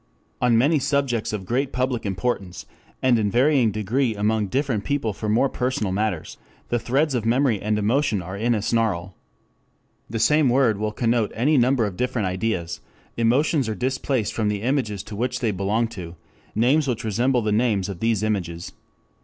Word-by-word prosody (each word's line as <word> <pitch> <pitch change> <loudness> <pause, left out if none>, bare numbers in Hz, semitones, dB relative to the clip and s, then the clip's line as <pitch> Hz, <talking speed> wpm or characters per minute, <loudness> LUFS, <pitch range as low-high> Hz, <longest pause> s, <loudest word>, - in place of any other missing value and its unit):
4 125 - +2
On 115 -2 +4
many 145 +6 +3
subjects 140 -5 0
of 105 -3 -4
great 130 +6 -1
public 125 -3 -1
importance, 95 -3 -3 0.4
and 125 -3 +4
in 105 -2 +1
varying 125 +1 +3
degree 110 +4 0
among 105 0 0
different 125 -2 -1
people 135 -6 -1
for 105 +2 -4
more 115 +6 +3
personal 125 -6 -2
matters, 100 -4 -2 0.3
the 120 - +1
threads 135 +6 +1
of 120 -4 -1
memory 120 -2 +2
and 105 0 0
emotion 115 +2 +1
are 90 +2 -6
in 115 +4 +1
a 105 - -2
snarl. 100 -6 0 0.9
The 115 - -3
same 150 +5 +3
word 120 -5 +3
will 105 0 -1
connote 115 -1 0
any 140 +7 +2
number 125 -2 +3
of 95 -3 -5
different 125 -5 -1
ideas: 90 -2 -2 0.4
emotions 130 +3 +2
are 110 - -2
displaced 130 0 -1
from 110 -2 -1
the 105 0 -3
images 120 -7 -1
to 110 - -8
which 125 +4 -2
they 115 -4 0
belong 100 +4 0
to 90 -6 -8 0.4
names 135 +7 +3
which 120 -3 -2
resemble 120 +3 +1
the 105 - 0
names 105 -3 +1
of 95 -4 -6
these 115 -1 +1
images. 90 -6 -2
115 Hz, 180 wpm, -23 LUFS, 105-130 Hz, 0.9 s, On